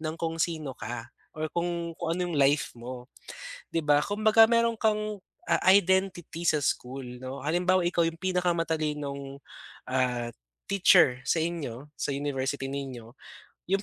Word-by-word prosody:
ng 155 Hz, 0 st, -3 dB
kung 165 Hz, 0 st, -3 dB
sino 155 Hz, -4 st, -1 dB
ka 120 Hz, -1 st, -7 dB, 0.2 s
or 155 Hz, 0 st, -3 dB
kung 170 Hz, -1 st, -2 dB
kung 165 Hz, +1 st, -1 dB
ano -, -, -3 dB
yung 155 Hz, -, -2 dB
life 140 Hz, +2 st, +3 dB
mo, 125 Hz, +1 st, -9 dB, 0.6 s
'di 165 Hz, -, 0 dB
ba? 145 Hz, 0 st, +5 dB
Kumbaga 215 Hz, +2 st, +5 dB
meron 230 Hz, 0 st, +2 dB
kang, 215 Hz, -1 st, 0 dB, 0.3 s
ah, 170 Hz, -1 st, +3 dB
identity 190 Hz, -3 st, +1 dB
sa 155 Hz, -3 st, +3 dB
school, 125 Hz, -1 st, -3 dB
'no, 130 Hz, +2 st, -6 dB
halimbawa 180 Hz, +5 st, +2 dB
ikaw 175 Hz, -1 st, +2 dB
yung 165 Hz, 0 st, -3 dB
pinakamatalinong, 155 Hz, -6 st, -1 dB, 0.5 s
ah, 125 Hz, -2 st, 0 dB, 0.4 s
teacher 180 Hz, -9 st, +5 dB
sa 165 Hz, -, +1 dB
inyo, 150 Hz, -6 st, -4 dB
sa 140 Hz, -, -2 dB
university 135 Hz, -1 st, -2 dB
ninyo. 130 Hz, -4 st, -6 dB, 0.6 s
Yung 195 Hz, +1 st, +2 dB
155 Hz, 145 wpm, -28 LUFS, 135-175 Hz, 0.6 s, ba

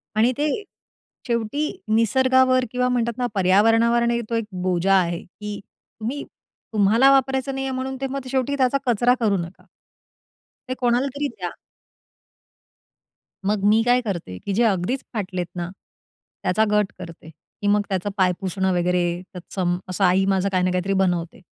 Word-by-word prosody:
आणि 225 Hz, +3 st, +4 dB
ते 295 Hz, +1 st, +1 dB, 0.8 s
शेवटी 235 Hz, +6 st, -1 dB, 0.2 s
निसर्गावर, 255 Hz, +3 st, +3 dB
किंवा 250 Hz, 0 st, +1 dB
म्हणतात 235 Hz, -2 st, 0 dB
ना 250 Hz, -1 st, 0 dB
पर्यावरणावर 225 Hz, +5 st, +4 dB
आणि 235 Hz, 0 st, +1 dB
तो 230 Hz, -, -1 dB
एक 230 Hz, -1 st, -1 dB, 0.2 s
बोजा 185 Hz, +1 st, +1 dB
आहे, 175 Hz, -2 st, +1 dB
की 210 Hz, +3 st, -8 dB, 0.4 s
तुम्ही 245 Hz, +6 st, -3 dB, 0.5 s
तुम्हाला 220 Hz, +6 st, +5 dB
वापरायचं 265 Hz, 0 st, +1 dB
नाहीये 270 Hz, 0 st, -2 dB
म्हणून, 260 Hz, +1 st, -3 dB
ते 270 Hz, -, 0 dB
मग 270 Hz, -1 st, -5 dB
शेवटी 270 Hz, +1 st, 0 dB
त्याचा 260 Hz, 0 st, +3 dB
कचरा 245 Hz, +1 st, +3 dB
करू 210 Hz, -4 st, +2 dB
नका. 170 Hz, +1 st, -7 dB, 1.1 s
ते -, -, 0 dB
कोणाला 245 Hz, +2 st, +2 dB
तरी 290 Hz, 0 st, -1 dB
द्या. 360 Hz, -, -6 dB, 2.0 s
मग 205 Hz, 0 st, 0 dB
मी 215 Hz, +2 st, +5 dB
काय 245 Hz, +1 st, +3 dB
करते, 175 Hz, -, -5 dB
की 200 Hz, -, -4 dB
जे 230 Hz, +5 st, +2 dB
अगदीच 215 Hz, +4 st, 0 dB
फाटलेत 185 Hz, -5 st, -3 dB
ना, 175 Hz, 0 st, -3 dB, 0.7 s
त्याचा 220 Hz, -, +2 dB
गट 210 Hz, -1 st, +2 dB
करते. 165 Hz, -3 st, -10 dB, 0.3 s
की 205 Hz, -, -1 dB
मग 205 Hz, 0 st, +4 dB
त्याचं 190 Hz, 0 st, -1 dB
पाय 185 Hz, -2 st, +4 dB
पुसणं, 190 Hz, -1 st, -1 dB
वगैरे 180 Hz, 0 st, +1 dB, 0.3 s
तत्सं 175 Hz, 0 st, -2 dB
असं 185 Hz, +2 st, -1 dB
आई 185 Hz, +2 st, +3 dB
माझं 190 Hz, +1 st, +1 dB
काही 185 Hz, -2 st, +1 dB
ना 185 Hz, -, +1 dB
काहीतरी 180 Hz, +2 st, 0 dB
बनवते. 175 Hz, -3 st, 0 dB
215 Hz, 155 wpm, -23 LUFS, 185-250 Hz, 2.0 s, तुम्हाला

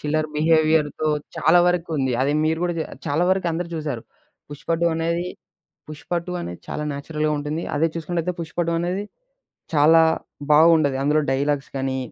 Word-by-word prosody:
చిల్లర 155 Hz, +1 st, 0 dB
బిహేవియర్‌తో 155 Hz, -1 st, +2 dB, 0.3 s
చాలా 165 Hz, +3 st, +4 dB
వరకు 175 Hz, -1 st, 0 dB
ఉంది. 130 Hz, -2 st, 0 dB
అది 140 Hz, +2 st, +1 dB
మీరు 160 Hz, +1 st, +1 dB
కూడా 175 Hz, -1 st, -1 dB, 0.3 s
చాలా 145 Hz, +4 st, +1 dB
వరకు 190 Hz, -2 st, +1 dB
అందరూ 170 Hz, +1 st, -3 dB
చూసారు. 145 Hz, -7 st, -4 dB, 0.5 s
పుష్ప 145 Hz, -, -11 dB
2 170 Hz, -, +3 dB
అనేది, 170 Hz, +2 st, -1 dB, 0.6 s
పుష్ప 155 Hz, +2 st, -11 dB
2 180 Hz, -, -6 dB
అనేది 85 Hz, -, -7 dB
చాలా 150 Hz, -, -3 dB
నేచురల్‍గా 150 Hz, +2 st, -2 dB
ఉంటుంది. 150 Hz, +3 st, -3 dB
అదే 160 Hz, +3 st, +2 dB
చూసుకున్నట్లయితే 170 Hz, +2 st, -2 dB
పుష్ప 160 Hz, -, -9 dB
2 170 Hz, -, 0 dB
అనేది 180 Hz, +4 st, -2 dB, 0.7 s
చాలా 160 Hz, +3 st, +6 dB, 0.5 s
బాగుండది. 155 Hz, -3 st, +5 dB
అందులో 150 Hz, +2 st, +3 dB
డైలాగ్స్‌ 140 Hz, +1 st, -1 dB
గాని 135 Hz, 0 st, -1 dB
155 Hz, 155 wpm, -22 LUFS, 145-165 Hz, 0.7 s, చాలా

